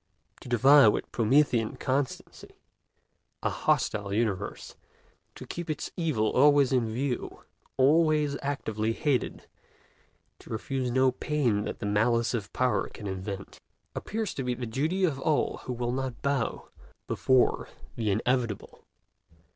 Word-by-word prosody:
To -, -, -11 dB
defy 135 Hz, +3 st, +7 dB
with 105 Hz, -, 0 dB
Promethean 120 Hz, -1 st, +2 dB
constancy 130 Hz, 0 st, -3 dB, 0.9 s
a -, -, +1 dB
hostile 100 Hz, -1 st, 0 dB
universe, 100 Hz, -2 st, -2 dB, 0.6 s
to -, -, -9 dB
keep 175 Hz, -1 st, -6 dB
its 155 Hz, -, -3 dB
evil 140 Hz, -11 st, 0 dB
always 140 Hz, 0 st, +5 dB
in 120 Hz, -4 st, +1 dB
view, 125 Hz, +2 st, -3 dB, 0.3 s
always 150 Hz, +1 st, +3 dB
actively 115 Hz, -6 st, -2 dB
hated, 140 Hz, -1 st, -1 dB, 0.9 s
to -, -, -16 dB
refuse 125 Hz, +3 st, -2 dB
no 130 Hz, +1 st, +3 dB
pain 125 Hz, -6 st, 0 dB
that -, -, -4 dB
the -, -, -6 dB
malice 115 Hz, +4 st, +2 dB
of 110 Hz, -4 st, -3 dB
Power 125 Hz, -6 st, 0 dB
can 105 Hz, -, -10 dB
invent, 95 Hz, 0 st, -6 dB, 0.3 s
appears 215 Hz, -2 st, -3 dB
to 135 Hz, -, -4 dB
be 125 Hz, -1 st, -1 dB
the 120 Hz, 0 st, -5 dB
duty 155 Hz, +11 st, -1 dB
of 150 Hz, -7 st, +1 dB
all 155 Hz, +1 st, 0 dB
who 125 Hz, -, -3 dB
will 120 Hz, 0 st, -2 dB
not 130 Hz, -1 st, -4 dB
bow 140 Hz, -4 st, -1 dB, 0.4 s
before 130 Hz, -1 st, +2 dB, 0.3 s
the 110 Hz, -3 st, -1 dB
inevitable. 115 Hz, +1 st, -1 dB
125 Hz, 130 wpm, -28 LUFS, 110-140 Hz, 0.9 s, defy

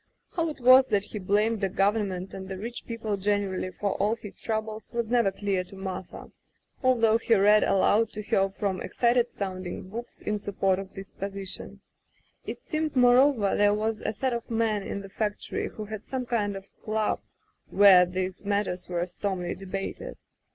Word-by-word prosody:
How 335 Hz, -2 st, -1 dB
it 300 Hz, -, -7 dB
was 255 Hz, +1 st, +7 dB
that 205 Hz, -2 st, +1 dB
he 210 Hz, 0 st, -6 dB
blamed 210 Hz, +3 st, +1 dB
the 195 Hz, -, +1 dB
Government 195 Hz, -1 st, 0 dB
and 190 Hz, 0 st, -7 dB
the 190 Hz, -, -4 dB
rich 235 Hz, +5 st, -6 dB
people 225 Hz, -3 st, -3 dB
generally 195 Hz, -2 st, -1 dB
for 200 Hz, +2 st, -2 dB
all 210 Hz, +3 st, +1 dB
his 210 Hz, -3 st, -10 dB
troubles 220 Hz, -1 st, -4 dB
was 235 Hz, -1 st, -2 dB
never 235 Hz, -5 st, +3 dB
clear 195 Hz, -1 st, -1 dB
to 195 Hz, -, -12 dB
Martha, 190 Hz, -1 st, -7 dB, 0.5 s
although 230 Hz, -4 st, +4 dB
he 230 Hz, 0 st, +3 dB
read 210 Hz, +1 st, +5 dB
aloud 210 Hz, +3 st, +3 dB
to 210 Hz, -, -5 dB
her 195 Hz, -3 st, +2 dB
from 195 Hz, -1 st, -2 dB
excited 240 Hz, 0 st, +2 dB
sounding 185 Hz, -2 st, -5 dB
books 235 Hz, +4 st, -7 dB
in 210 Hz, 0 st, -2 dB
support 195 Hz, -2 st, 0 dB
of 195 Hz, 0 st, -9 dB
this 195 Hz, +1 st, -9 dB
position. 195 Hz, -1 st, -5 dB, 0.7 s
It -, -, -6 dB
seemed, 310 Hz, -1 st, -2 dB
moreover, 250 Hz, -3 st, +5 dB
there 205 Hz, 0 st, +4 dB
was 215 Hz, 0 st, -1 dB
a -, -, -1 dB
set 255 Hz, +4 st, -1 dB
of 235 Hz, -1 st, -4 dB
men 225 Hz, -2 st, +1 dB
in 200 Hz, 0 st, -5 dB
the 195 Hz, -, -9 dB
factory 210 Hz, +1 st, -3 dB
who 215 Hz, -, -7 dB
had 215 Hz, 0 st, -7 dB
some 260 Hz, -2 st, -4 dB
kind 210 Hz, -4 st, -1 dB
of 195 Hz, 0 st, -8 dB, 0.2 s
club 215 Hz, 0 st, 0 dB, 0.5 s
where 195 Hz, -2 st, +8 dB
these 185 Hz, +1 st, -3 dB
matters 200 Hz, -3 st, -1 dB
were 175 Hz, -1 st, -1 dB
stormily 180 Hz, -1 st, -3 dB
debated. 195 Hz, 0 st, -6 dB
205 Hz, 180 wpm, -27 LUFS, 195-225 Hz, 0.7 s, where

